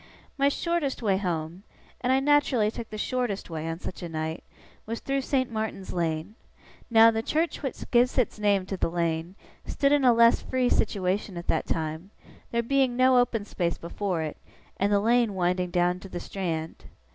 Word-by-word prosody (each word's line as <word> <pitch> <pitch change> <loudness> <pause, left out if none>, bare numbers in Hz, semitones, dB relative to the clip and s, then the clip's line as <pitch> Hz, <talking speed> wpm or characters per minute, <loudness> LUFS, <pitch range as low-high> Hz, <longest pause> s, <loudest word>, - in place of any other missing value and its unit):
My 280 0 +3
shortest 305 -4 -1
way 195 -3 +2
home, 170 -2 -3 0.4
and 250 - +1
I 265 - +4
naturally 270 -6 +3
took 230 0 -7
the 215 - -6
shortest 230 -5 -2
way 160 0 -4
on 165 +1 -4
such 185 - -7
a 175 - -5
night 160 0 -4 0.4
was 230 +1 -3
through 275 0 -1
St. 260 -2 0
Martin's 215 -3 -4
Lane. 165 +2 -2 0.6
Now, 225 -1 +7
the 225 0 -1
church 320 +8 -1
which 270 -4 -4
gives 245 +1 +3
its 245 -4 +1
name 200 -2 +2
to 190 0 -4
the - - 0
lane, 170 +1 -2 0.3
stood 280 0 +1
in 290 -1 +3
a 250 - +7
less 235 0 +5
free 255 -1 0
situation 195 -2 0
at 170 - -6
that - - +1
time; 160 +3 -3 0.4
there 235 0 0
being 260 0 +1
no 255 0 +5
open 230 -4 0
space 175 -4 -2
before 175 0 -3
it, 155 - -5 0.4
and 200 +1 +1
the 205 - +4
lane 230 -1 +2
winding 180 0 0
down 175 +1 +1
to 195 - -11
the 175 - -5
Strand. 165 -4 -4
205 Hz, 190 wpm, -27 LUFS, 175-245 Hz, 0.6 s, Now